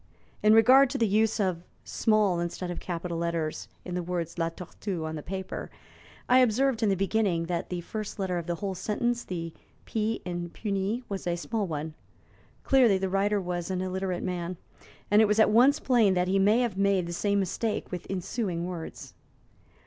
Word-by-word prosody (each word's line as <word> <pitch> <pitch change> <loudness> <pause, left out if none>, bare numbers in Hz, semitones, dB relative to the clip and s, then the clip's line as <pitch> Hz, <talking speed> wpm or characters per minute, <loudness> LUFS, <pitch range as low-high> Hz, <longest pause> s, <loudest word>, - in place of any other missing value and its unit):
In 215 +1 +6
regard 255 +4 +7
to 275 - -2
the 230 - +2
use 220 +2 +2
of 185 -4 0 0.2
small 210 -5 +2
instead 175 +1 -3
of 175 - -5
capital 170 -1 -4
letters 170 -2 -2 0.2
in 180 - -5
the 180 - -1
words 170 -1 -4
'La 165 0 +1
Tortue' 175 0 -6
on 160 0 -4
the 150 - -5
paper, 190 +4 -5 0.6
I 250 +1 +6
observed, 250 0 +2
in 220 - +3
the 195 - +3
beginning, 195 -3 +1
that 170 0 -3
the 180 -1 -3
first 215 +4 -6
letter 185 -3 -1
of 170 - -7
the 175 - -1
whole 195 +2 -3
sentence 235 +5 -1
the 165 -2 -5 0.3
'p' 220 0 -2
in 175 -1 -4
'puni' 200 +5 -2
was 195 -3 -5
a 175 - +1
small 210 +3 -2
one. 155 -1 -4 0.7
Clearly, 245 -7 +5
the 190 0 -2
writer 200 +2 +1
was 175 -2 -3
an 185 -1 -1
illiterate 185 -1 -2
man, 180 -1 -3 0.5
and 210 +1 +6
it - - +6
was 210 +1 +1
at 220 - +5
once 250 +6 +5
plain 225 -7 +3
that 180 0 +1
he 195 +1 +2
may 210 +5 +4
have 220 -6 -1
made 195 -2 +2
the 170 - -5
same 200 +3 0
mistake 210 +3 -2
with 180 -2 -5
ensuing 185 -2 -2
words. 175 -3 -7
190 Hz, 195 wpm, -28 LUFS, 175-215 Hz, 0.7 s, regard